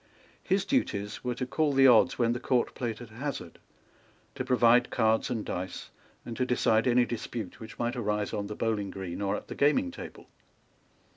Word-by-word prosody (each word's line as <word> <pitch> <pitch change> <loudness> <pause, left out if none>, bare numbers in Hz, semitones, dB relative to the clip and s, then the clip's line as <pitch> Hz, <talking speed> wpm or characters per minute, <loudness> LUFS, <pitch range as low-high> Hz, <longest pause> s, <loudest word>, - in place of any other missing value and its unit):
His 195 +1 0
duties 105 - -1
were 125 -1 -2
to 130 - -3
call 150 +3 0
the 135 0 +5
odds 125 0 +6
when 120 -1 +2
the 120 - -3
Court 125 -1 0
played 120 -2 -4
at 120 - -9
hazard, 135 +5 -6 0.7
to - - -4
provide 125 -1 +4
cards 110 -1 +1
and 115 -4 -3
dice, 90 0 -5 0.3
and 115 - -6
to 130 - +1
decide 120 -2 +2
any 125 0 +4
dispute 115 -3 -5
which 110 0 -10
might 120 +2 -1
arise 105 -3 -1
on 100 0 -2
the 105 - -6
bowling 105 -3 -1
green 95 -1 -6
or 100 -1 0
at - - -7
the - - -6
gaming 205 - +2
table. - - -10
120 Hz, 190 wpm, -29 LUFS, 110-125 Hz, 0.7 s, odds